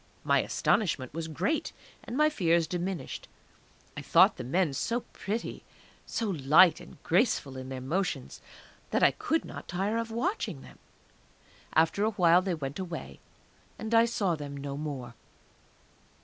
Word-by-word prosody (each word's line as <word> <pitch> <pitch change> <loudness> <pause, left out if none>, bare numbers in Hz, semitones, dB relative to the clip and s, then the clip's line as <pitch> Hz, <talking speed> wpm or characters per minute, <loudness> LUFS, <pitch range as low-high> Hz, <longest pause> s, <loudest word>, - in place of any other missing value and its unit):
My - - +3
astonishment 145 - 0
was 165 0 -4
great, 180 - -1 0.3
and 245 - -5
my 305 +1 +5
fears 170 - +2
diminished. 180 +2 -4 0.7
I - - -5
thought - - +5
the - - -5
men 155 +4 +1
so 230 - -1
pretty, 220 +1 -5 0.4
so 230 - -2
light 160 +3 +5
and - - -13
graceful 165 - +1
in 130 0 -7
their 130 -1 -5
motions, 180 +9 -2 0.5
that - - +1
I - - +7
could 320 - -1
not - - -9
tire 195 +5 -1
of 230 0 -2
watching 340 - -2
them. - - -15 0.9
After 165 +5 +3
a 215 - +3
while 180 -4 +4
they 185 -2 -1
went 140 +1 -5
away, 185 -2 -6 0.6
and 220 +1 -5
I 230 0 +6
saw 205 -6 0
them 145 -2 -6
no 140 0 -5
more. 140 -5 -5
175 Hz, 150 wpm, -29 LUFS, 145-220 Hz, 0.9 s, I